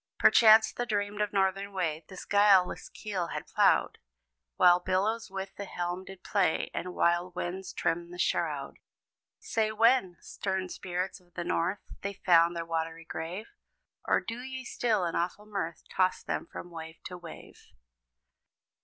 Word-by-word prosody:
Perchance 220 -1 +7
the 245 - -3
dreamed 205 -1 -1
of 210 -1 0
Northern 195 0 0
Way 165 -4 -2
This 185 -2 -9
guileless 200 -3 +4
keel 190 -5 -4
had - - -5
plowed, - - +2 0.6
While 175 0 +6
billows 205 +6 0
with 190 0 -5
the 200 - -5
helm 175 0 -4
did 195 -1 -11
play, 190 -6 +1
And 180 0 -4
wild 175 +1 +1
winds 180 +2 -4
trimmed 170 +1 -1
the 180 - -9
shroud. 175 - -1 0.6
Say 220 -1 -1
when, 220 -4 +3
Stern 190 -1 -3
Spirits 180 +2 -4
of 175 -1 -29
the 175 - -3
North, 175 +4 0 0.2
They 200 0 -3
found 170 -3 +4
their 170 0 -3
watery 165 0 -3
grave? 170 +7 -5 0.6
Or - - +4
do 230 +1 -6
ye 260 0 -6
still 220 -7 0
in 170 - -2
awful 180 +4 -2
mirth, 190 -6 -4
Toss 185 0 +1
them - - -3
from 175 - -8
wave 160 -1 -8
to 180 - -7
wave? 175 -2 -12
185 Hz, 155 wpm, -30 LUFS, 175-205 Hz, 0.6 s, Perchance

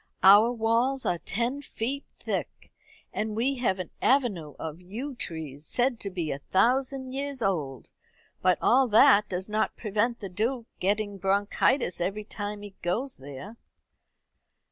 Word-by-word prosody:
"Our 205 +5 +8
walls 240 +3 +1
are 175 - 0
ten 240 +10 -2
feet 275 +1 -4
thick, - - -4 0.4
and 215 0 -2
we 260 +5 +1
have 230 -6 +1
an 185 -2 -6
avenue 205 - +1
of 160 +2 -6
yew 230 +11 -6
trees 155 - -6
said 245 -1 +1
to 200 - -4
be 175 -5 -3
a 135 - -4
thousand 260 - +1
years 280 0 -4
old. 150 -10 -2 0.5
But 185 -1 +4
all 260 +2 +5
that 210 -2 +6
does 185 0 -3
not 215 +1 -1
prevent 225 +2 0
the 200 - -5
Duke 225 +6 -2
getting 205 +1 0
bronchitis 195 +1 +1
every 200 +4 -2
time 205 -1 -6
he 205 -1 -9
goes 235 +10 -2
there." 145 - -9
210 Hz, 145 wpm, -27 LUFS, 185-245 Hz, 0.5 s, Our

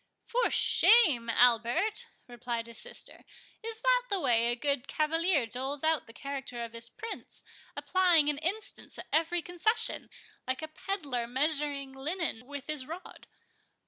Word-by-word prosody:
"For 485 0 +1
shame, 310 - +5
Albert!" 245 - +3 0.2
replied 240 -1 -4
his 235 0 -11
sister; - - -10 0.4
"is 445 0 -5
that - - +4
the 395 - +1
way 235 -6 +3
a 240 - +2
good 280 0 -1
cavalier 325 -2 +1
doles 265 +5 -3
out 315 -1 +1
the - - -11
character 270 -3 -5
of 230 0 -8
his 230 0 -4
Prince, 450 - -8 0.3
applying 355 -5 +3
an 295 -1 0
instance 380 +8 -1
at - - -8
every 330 +2 +1
concession, 360 +6 0 0.4
like 260 +4 -2
a - - -3
pedlar 290 -9 -3
measuring 280 +1 -1
linen 275 -3 -3
with 285 -1 -7
his 295 -4 -3
rod? 340 +4 -9
290 Hz, 145 wpm, -30 LUFS, 245-350 Hz, 0.4 s, shame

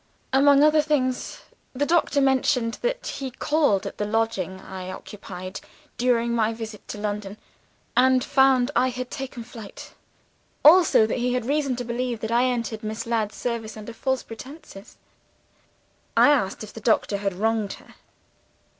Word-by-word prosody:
Among 280 +1 +6
other 305 0 +5
things, 265 -4 -1 0.3
the 280 +3 0
doctor 315 -3 +2
mentions 265 -3 +1
that - - -2
he 270 -1 -4
called 275 -5 +1
at - - -7
the 210 - 0
lodging 210 -4 -1
I 185 -1 -8
occupied 185 -1 -8 0.4
during 235 -1 +1
my 225 -1 +1
visit 220 -2 -8
to - - -6
London, 205 -1 -4 0.6
and 255 0 +4
found 265 -2 +3
I 255 - +4
had 250 0 -6
taken 265 -4 -6
to 225 - -19
flight: 220 -4 -10 0.7
also 320 -8 +7
that 220 - -2
he 245 +1 0
had 250 -2 -2
reason 280 -1 0
to 245 - -4
believe 240 -1 -3
I 230 +2 +2
had 255 0 +2
entered 230 -2 -3
Miss 220 +2 -4
Ladd's 225 -3 -1
service, 230 -3 -4
under 215 +2 -8
false 265 +2 -1
pretenses.' 230 -3 -11 1.2
"I 290 - +7
asked 215 -8 0
if 215 - -10
the 225 - -9
doctor 215 -2 +2
had 195 -1 -2
wronged 220 0 0
her. - - -15
235 Hz, 160 wpm, -24 LUFS, 215-265 Hz, 1.2 s, also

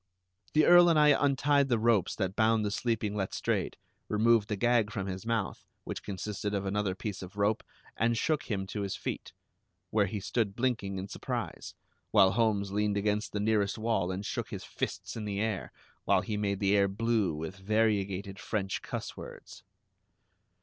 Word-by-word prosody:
The 155 - +5
Earl 175 0 +8
and 165 - +4
I 150 0 +6
untied 140 0 +3
the 120 - +3
ropes 110 -4 +2
that 95 -2 -2
bound 110 -1 +3
the 100 - -1
sleeping 110 -2 -1
Letstrayed, 95 -2 -1 0.3
removed 110 0 +3
the 105 - 0
gag 115 0 +2
from 100 -5 -3
his 95 +2 -5
mouth, 115 -4 -1 0.2
which - - -5
consisted 105 +1 -4
of 100 0 -2
another 100 -1 -1
piece 105 0 -5
of 95 +2 -10
rope, 105 +1 +2 0.3
and 115 +1 +1
shook 155 +5 0
him 95 -3 -1
to 105 +2 -5
his 100 -1 -2
feet, - - -5 0.6
where 105 -2 +3
he 105 +3 -4
stood 100 0 -1
blinking 115 -6 -1
in 95 +1 -4
surprise, - - -5 0.3
while 95 -3 +6
Holmes 105 -4 +1
leaned 105 0 0
against 105 +1 0
the 105 - -2
nearest 105 -1 +1
wall 110 -5 0
and 95 +2 -4
shook - - -3
his - - -6
fists - - -4
in 110 -2 -4
the 100 -1 -3
air, 110 -3 -2 0.3
while - - +4
he 105 - -3
made 100 -2 -1
the 100 0 +3
air 100 -1 +4
blue 105 -3 0
with 80 +5 -6
variegated 100 -2 0
French 95 -3 -2
cuss - - -5
words. - - -10
105 Hz, 180 wpm, -30 LUFS, 100-115 Hz, 0.6 s, Earl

